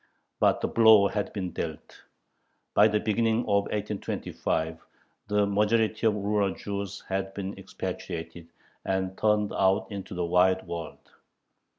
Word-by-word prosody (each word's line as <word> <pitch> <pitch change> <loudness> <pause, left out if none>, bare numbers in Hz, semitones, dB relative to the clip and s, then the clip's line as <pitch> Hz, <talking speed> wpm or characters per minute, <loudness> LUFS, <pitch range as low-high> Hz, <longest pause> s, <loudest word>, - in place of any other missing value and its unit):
But - - +3
the - - +1
blow 110 -3 +6
had 105 -3 -2
been 95 -4 -4
dealt. 80 -2 -7 0.7
By 105 - +6
the 105 0 +1
beginning 110 +1 +1
of 100 -3 +1
1825 100 -6 -3 0.5
the 105 0 +2
majority 110 +2 +2
of 105 - +2
rural 100 -1 0
Jews 100 -1 -5
had 95 0 -3
been 100 0 -4
expatriated, 80 0 -6 0.3
and 95 0 -1
turned 105 -1 +1
out 95 0 +2
into 100 -1 -6
the 90 -1 -1
wide 95 +2 +3
world. 85 -2 -7
100 Hz, 130 wpm, -27 LUFS, 95-105 Hz, 0.7 s, blow